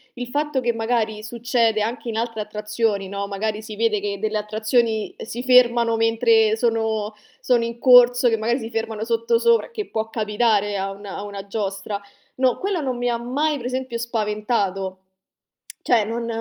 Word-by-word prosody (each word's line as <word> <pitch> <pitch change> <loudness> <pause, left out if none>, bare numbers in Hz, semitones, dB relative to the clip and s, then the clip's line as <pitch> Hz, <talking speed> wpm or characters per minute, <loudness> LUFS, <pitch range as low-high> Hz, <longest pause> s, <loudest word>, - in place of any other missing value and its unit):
il 245 0 -5
fatto 290 0 -1
che, 240 -1 +1
magari, 225 -2 -1
succede 230 -1 0
anche 230 +2 -3
in 220 - -4
altre 230 -2 -2
attrazioni, 210 -1 -2
no, 200 0 -3
magari, 210 +2 -3
si 215 -1 -8
vede 220 -1 +1
che 200 -1 -4
delle 215 0 -1
attrazioni 220 +1 0
si 235 +2 -5
fermano 240 -2 +4
mentre 225 -1 +3
sono 220 -2 0 0.3
sono 240 -2 +2
in 235 0 -6
corso, 245 -1 +6
che, 225 - +1
magari, 235 +4 0
si 225 0 -6
fermano 225 -1 -3
sottosopra, 230 - +2
che 425 -3 -5
può 220 0 -3
capitare 210 -2 +1
a 195 0 -2
una 200 0 -8
a 200 - -5
una 200 -1 -7
giostra. 200 0 -3 0.4
No, 255 -2 +2
quella 390 -3 -1
non 260 -4 -2
mi 245 0 -1
ha 235 - 0
mai, 285 +6 -1
per 245 - -8
esempio, 255 -2 -3
spaventato. 210 -4 -2 0.8
Cioè, 230 -4 +3
non 230 +2 -3
225 Hz, 170 wpm, -22 LUFS, 210-240 Hz, 0.8 s, corso